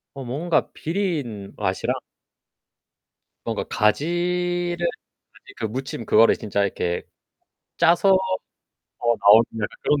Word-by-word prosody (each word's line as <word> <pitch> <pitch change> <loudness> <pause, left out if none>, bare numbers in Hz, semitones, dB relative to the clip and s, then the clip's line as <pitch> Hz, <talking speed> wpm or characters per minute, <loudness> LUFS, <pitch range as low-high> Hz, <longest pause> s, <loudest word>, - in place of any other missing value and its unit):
어, 135 - -6
뭔가 155 +7 0
비린 155 - -3
맛이랑 - - -1 1.5
뭔가 - - -2
가지를 175 +8 0 0.6
가지 - - -17
그 - - -3
무침 125 +1 -5
그거를 115 +2 +5
진짜 100 -2 -1
이렇게 90 -3 -2 0.7
짜서 175 +3 +4 0.9
더 120 -1 +1
나오는 105 +3 +7 0.2
약간 105 - -4
그런 150 - +2
135 Hz, 215 characters per minute, -23 LUFS, 110-175 Hz, 1.5 s, 나오는